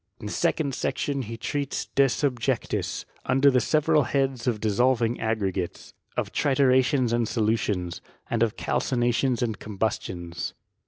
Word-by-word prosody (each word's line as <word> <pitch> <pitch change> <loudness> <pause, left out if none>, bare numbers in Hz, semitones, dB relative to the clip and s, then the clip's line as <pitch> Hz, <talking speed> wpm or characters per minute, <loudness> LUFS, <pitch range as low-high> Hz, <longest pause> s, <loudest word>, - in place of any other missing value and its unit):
In - - -9
the - - -4
second 140 -4 0
section 140 +2 -1
he 115 -1 -6
treats 140 +4 -2
de 140 - +3
tubjectU, 125 -2 -1 0.2
under 135 +2 +5
the 125 -1 +3
several 155 +4 +3
heads 135 -2 0
of 115 -4 +1
dissolving 115 +2 +2
aggregatea, 100 -5 -2 0.2
of - - -2
tritura 130 -2 +4
tions 125 -3 +1
and 120 -1 +1
solutions, 105 -7 -1 0.3
and 115 - -1
of 115 -1 +2
ralcinations 120 0 +1
and 110 -3 -2
combus 105 +1 -1
tioDE. 85 -2 -5
120 Hz, 145 wpm, -26 LUFS, 110-135 Hz, 0.3 s, under